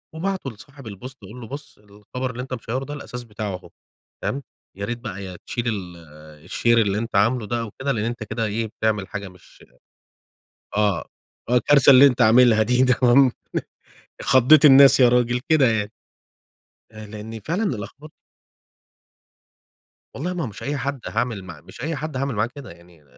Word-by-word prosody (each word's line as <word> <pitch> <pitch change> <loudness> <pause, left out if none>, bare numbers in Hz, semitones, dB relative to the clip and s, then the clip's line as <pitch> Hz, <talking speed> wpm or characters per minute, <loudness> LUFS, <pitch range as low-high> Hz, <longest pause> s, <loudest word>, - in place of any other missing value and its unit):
وباعته 185 -4 -3
لصاحب 135 +3 -14
البوست 125 +6 -9
أقول 110 +6 -11
له 115 - -9
بُص 140 +3 -9
الخبر 105 +5 -7
اللي 125 - -6
أنت 130 0 -7
مشيّره 125 +3 -4
ده 145 - -7
الأساس 125 -4 -7
بتاعه 105 -4 -5
أهو - - -12 0.5
فاهم؟ 140 +1 -3 0.3
يا 100 - -4
ريت 120 +3 -4
بقى 100 -4 -7
يا 90 -2 -8
تشيل 120 0 -3
ال 95 -6 -4 0.5
الشير 120 0 +1
اللي 100 -1 0
أنت 115 -1 -4
عامله 115 +3 +2
ده 120 +2 -2
أو 110 -3 -6
كده، 140 +1 -1
لإن 110 -4 -2
أنت 120 -1 -4
كده 110 +1 -3
إيه، 110 +2 -2
بتعمل 105 -2 -2
حاجة 100 -2 -6
مش 90 -1 -19 1.1
آه. 105 -5 +1 0.4
آه. 125 - +1
الكارثة 140 +3 +5
اللي 135 +1 +9
أنت 125 -2 +2
عاملها 115 0 +5
دي 125 +3 +2
تمام؟ 125 +1 +4 0.9
خضّيت 135 +4 +5
الناس 135 -1 +8
يا 125 - +7
راجل، 120 0 +1
كده 155 -4 +5
يعني. 105 -3 0 1.0
آآ، 110 -1 -10
لإن 110 +1 -8
فعلًا 170 - -2
الأخب 145 - -5 2.1
والله 175 +6 -3
ما 175 - -3
هو - - -3
مش 105 - -10
أي 145 +1 -2
حد 135 +1 -3
هاعمل 115 -3 -2
معاه، 85 -5 -11
مش - - -13
أي 160 +1 -2
حد 150 0 -5
هاعمل 135 -1 -2
معاه 105 +2 0
كده. 140 -8 -10
يعني 85 -2 -19
120 Hz, 175 wpm, -22 LUFS, 105-135 Hz, 2.1 s, اللي